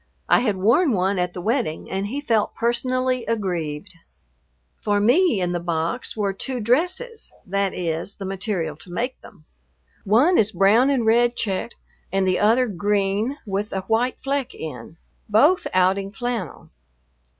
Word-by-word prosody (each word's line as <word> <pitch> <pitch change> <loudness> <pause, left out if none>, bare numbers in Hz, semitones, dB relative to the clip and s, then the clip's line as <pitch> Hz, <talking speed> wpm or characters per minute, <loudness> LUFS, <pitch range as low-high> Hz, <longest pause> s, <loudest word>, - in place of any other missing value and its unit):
I - - +5
had 225 -5 0
worn 235 - +3
one 190 0 +1
at 180 0 -1
the 180 - -5
wedding 225 - -1
and 195 +1 -2
he 275 +7 -4
felt 225 -6 0
personally 255 +1 0
aggrieved. 175 -9 -3 0.9
For 205 0 +1
me 250 - +3
in 180 -1 0
the 175 - -1
box 170 +7 -2
were 200 -2 0
two 255 +6 -4
dresses, 360 - 0
that 200 0 -1
is, 170 +2 -3
the 195 - -7
material 190 -5 -3
to 175 - -15
make 245 +8 -3
them. 165 -7 -16 0.6
One 260 - +4
is 215 -2 +1
a - - -13
brown 215 +8 +5
and 260 -5 +1
red 240 +2 +3
checked, 205 +2 -2 0.4
and 195 -1 +1
the 185 - +2
other 230 +5 +4
green 205 +4 0
with 205 +1 -3
a 190 - -1
white 225 +6 0
fleck 275 -1 -2
in, 160 +1 -8 0.3
both 290 - +4
outing 190 +2 +2
flannel. 240 +1 -5
210 Hz, 160 wpm, -22 LUFS, 190-245 Hz, 0.9 s, I